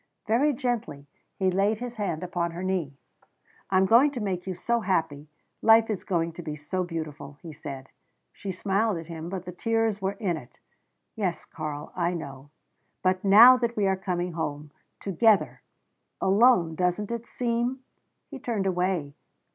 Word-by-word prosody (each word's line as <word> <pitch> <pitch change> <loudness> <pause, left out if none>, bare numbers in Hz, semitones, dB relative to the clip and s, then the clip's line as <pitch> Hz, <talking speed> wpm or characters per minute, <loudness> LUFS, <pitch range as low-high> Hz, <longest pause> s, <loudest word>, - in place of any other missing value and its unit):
Very 250 +8 +3
gently 240 - -3 0.3
he 190 -1 +1
laid 200 +4 +2
his 240 0 -7
hand 185 -5 -2
upon 175 -1 -1
her 175 +2 -5
knee. 175 -7 -2 0.7
"I 190 - +3
am 190 - +5
going 235 +9 +6
to 250 - -4
make 190 -4 -3
you 185 - -3
so 235 +7 0
happy. 160 -7 -1 0.3
Life 225 0 +6
is 205 - -3
going 170 -2 0
to 175 - -8
be 155 -3 -5
so 180 +5 -3
beautiful," 150 -4 -6
he 165 -2 -8
said. 135 -2 -8 0.4
She 195 - -5
smiled 195 +2 0
at 165 - -7
him, 165 0 -7
but 185 -1 -5
the 180 - -6
tears 225 +1 0
were 195 +1 -1
in 195 -5 -2
it. 125 -3 -13 0.6
"Yes, 190 -6 -2
Karl 150 -2 -6
I 175 0 0
know. 140 -3 -8 0.5
But 185 0 +1
now 225 +6 +9
that 235 -2 -2
we 205 - +2
are 190 0 +2
coming 180 -2 -2
home 150 -3 -4 0.3
together 205 +2 +2 0.6
alone, 195 -4 +4
doesn't 180 +5 -1
it 235 0 -4
seem 240 +2 -1 0.2
" - - -50
He 275 - -7
turned 225 -6 -2
away. 180 -5 0
185 Hz, 170 wpm, -27 LUFS, 165-220 Hz, 0.7 s, now